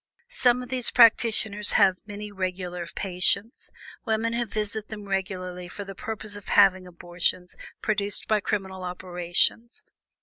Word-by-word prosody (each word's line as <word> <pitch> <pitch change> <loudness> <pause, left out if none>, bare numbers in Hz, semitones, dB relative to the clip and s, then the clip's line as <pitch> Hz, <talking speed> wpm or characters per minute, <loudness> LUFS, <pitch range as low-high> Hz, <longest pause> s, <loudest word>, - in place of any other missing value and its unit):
Some 250 - +3
of 250 - -10
these 255 -2 0
practitioners 220 -3 +4
have 190 -1 +5
many 210 0 -7
regular 180 -2 -4
patients 195 +5 0 0.3
women 225 +1 0
who 235 0 -1
visit 215 0 -3
them 210 -2 -8
regularly 185 -2 -3
for 205 +3 -7
the 195 - -7
purpose 215 +1 -6
of 205 - -11
having 190 -2 +4
abortions 175 +1 -2 0.3
produced 205 -2 -1
by 215 -1 +3
criminal 190 -2 -3
operations. 180 +5 -1
200 Hz, 135 wpm, -26 LUFS, 185-220 Hz, 0.3 s, have